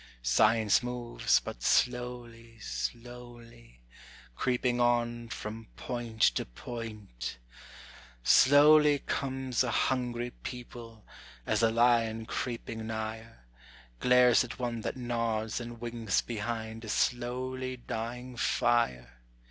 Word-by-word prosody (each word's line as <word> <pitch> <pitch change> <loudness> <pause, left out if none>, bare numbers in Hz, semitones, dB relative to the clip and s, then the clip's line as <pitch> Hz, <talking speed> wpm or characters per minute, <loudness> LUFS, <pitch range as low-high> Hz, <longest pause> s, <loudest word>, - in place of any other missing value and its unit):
Science 110 - +4
moves, 120 -1 0
but - - -8
slowly, 120 - -1
slowly, 115 - -7 0.5
creeping 125 -1 0
on 120 -1 +1
from 110 +1 -6
point 120 -3 -4
to - - +4
point: 105 - -7 0.9
Slowly 145 - +6
comes 130 -2 -1
a 125 - -1
hungry 120 -1 0
people, 120 -3 -9 0.4
as - - +1
a 115 - +4
lion, 115 -1 +2
creeping 115 -2 -4
nigher, 110 - -6 0.6
Glares 125 -1 +5
at 125 - -8
one 120 -2 -3
that 110 - -4
nods 115 -2 -2
and 120 0 -8
winks 115 -3 -1
behind 115 0 -4
a 110 - -7
slowly 130 +2 -1
dying 120 +2 -5
fire. 60 - 0
120 Hz, 100 wpm, -30 LUFS, 110-125 Hz, 0.9 s, Slowly